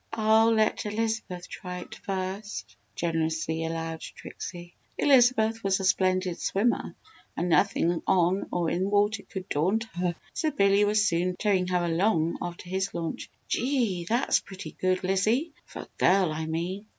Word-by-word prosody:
"I'll 220 0 +4
let 220 -1 +1
Elizabeth 215 -4 -3
try 180 -1 -7
it - - -10
first," 195 +2 -5 0.2
generously 160 -1 -1
allowed 165 0 -4
Trixie. 175 -1 -8 0.2
Elizabeth 240 -5 +4
was 195 -1 +2
a 190 - -2
splendid 185 -1 +1
swimmer 220 +5 0 0.4
and 175 - -1
nothing 175 -1 +2
on 185 +1 +2
or 170 -2 0
in 190 +3 0
water 205 +1 +2
could 190 -1 -8
daunt 185 +10 +1
her, 175 -1 -1 0.2
so 315 - 0
Billy 200 -6 +3
was 210 +1 +3
soon 180 +1 0
towing 190 -3 +1
her 180 -1 +1
along 170 -1 +1
after 175 0 -6
his 190 +2 -2
launch. 165 -1 -4 0.2
"Gee! 235 -10 0
That's 240 +4 +2
pretty 190 0 -9
good, 185 0 -1
Lizzie 215 - +1
for - - -8
a - - -18
girl, 185 -3 +4
I 160 +1 -3
mean!" 180 +6 -3
190 Hz, 150 wpm, -27 LUFS, 175-215 Hz, 0.4 s, I'll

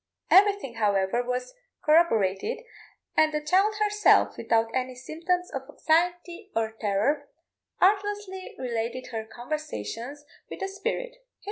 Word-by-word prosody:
Everything, 400 - +5
however, 205 +1 +2
was 250 +1 -3 0.3
corroborated, 300 - +3 0.5
and 310 0 +4
the 300 - 0
child 375 +8 +2
herself, 420 0 +4
without 225 0 +1
any 255 0 -2
symptoms 340 +7 -2
of 270 - -3
anxiety 350 +5 0
or 225 -1 0
terror, 220 +7 0 0.5
artlessly 400 -1 0
related 240 0 -3
her 220 -1 -4
conversations 285 +1 -5 0.2
with - - -7
the 390 - -1
spirit. 480 +5 -4
300 Hz, 115 wpm, -27 LUFS, 235-380 Hz, 0.5 s, Everything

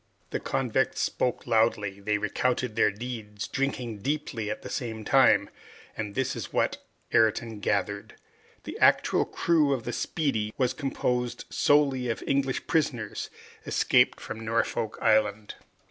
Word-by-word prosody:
The - - -1
convicts 130 +1 0
spoke 125 - -1
loudly, 110 -4 +1
they 105 +1 0
recounted 125 +1 -1
their 110 - +4
deeds, 105 -1 -6
drinking 130 -6 -2
deeply 130 -4 -2
at 105 - -5
the - - -7
same 110 -3 -4
time, 135 +1 +5 0.5
and 105 -2 -5
this 135 -1 0
is - - -6
what - - 0 0.3
Ayrton 110 0 +2
gathered. - - -1 0.5
The - - -7
actual - - +4
crew 155 -4 +2
of 125 -4 -3
the 120 - -4
"Speedy" 110 -10 -1
was 130 -1 +1
composed 125 -3 -2
solely 140 -4 +3
of 115 - -3
English 135 -1 0
prisoners, 125 -10 -1 0.3
escaped - - +3
from 110 - -7
Norfolk 115 0 -1
Island. 110 -1 +2
120 Hz, 135 wpm, -27 LUFS, 110-135 Hz, 0.5 s, time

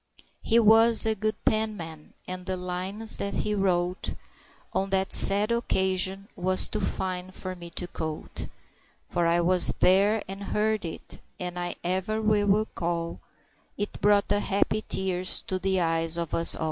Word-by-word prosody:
He 230 - +2
was 225 0 +6
a 220 - +2
good 215 +1 -2
penman, 205 -8 -3
and 180 0 -7
the 185 0 -2
lines 185 +5 0
that 200 - -3
he 210 - -2
wrote 180 -2 -1 0.6
On 195 +1 -1
that 190 0 0
sad 205 +3 +7
occasion 190 -3 0
was 185 0 +2
too 215 - -4
fine 185 -2 -3
for 185 0 -7
me 170 -1 -10
to 175 +1 -6
quote, 155 -2 -6 0.6
For 175 -1 -1
I 170 +1 +2
was 180 +1 +4
there 200 +4 +3
and 195 +1 -7
heard 215 -1 -1
it, 165 - -7 0.2
and 180 -1 -5
I 175 0 -4
ever 190 +5 -2
will 210 -1 +1
recall 175 -5 -1 0.6
It 205 0 -5
brought 205 0 +3
the 205 0 +1
happy 205 +2 0
tears 185 -1 0
to 185 - -4
the 190 0 0
eyes 165 -1 0
of 170 -2 -4
us 165 - +4
all. - - -10
190 Hz, 160 wpm, -26 LUFS, 180-210 Hz, 0.6 s, sad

